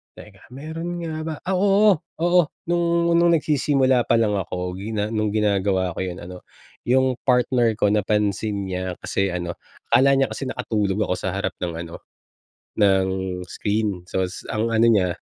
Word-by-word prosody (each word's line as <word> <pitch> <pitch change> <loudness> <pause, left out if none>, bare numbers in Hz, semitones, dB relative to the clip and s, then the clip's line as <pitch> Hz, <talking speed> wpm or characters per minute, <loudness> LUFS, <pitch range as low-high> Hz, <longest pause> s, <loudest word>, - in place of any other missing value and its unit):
Teka, 100 -3 -14
meron 165 +5 -5
nga 155 -1 -4
ba? 160 - -3
Ah, 190 0 -1
oo, 200 0 +4 0.2
oo 175 +1 +5 0.3
nung 170 0 +2
nung 170 0 +4
nagsisimula 135 -5 +2
pa - - +1
lang 110 -3 +2
ako 90 -1 -4
gina 105 +1 -3
nung 110 -2 -1
ginagawa 100 -3 +1
ko - - -1
yun 90 0 -6
ano, 90 +1 -10 0.4
yung 130 0 +2
partner 125 -2 +3
ko 105 -1 +1
napansin 105 -1 0
niya, 90 0 -3
kasi 100 -2 -1
ano, 85 -1 -4 0.3
akala 140 +2 +5
niya 135 0 +2
kasi 135 - -5
nakatulog 105 -5 -1
ako 100 - 0
sa 95 - -3
harap 95 -1 -3
ng 90 -2 -4
ano, 85 0 -7 0.8
ng 95 -2 +3 0.4
screen 105 -2 -2
sos 90 +1 -3
ang 110 +1 0
ano 115 +1 +4
niya, 95 -5 +3
105 Hz, 160 wpm, -22 LUFS, 95-140 Hz, 0.8 s, oo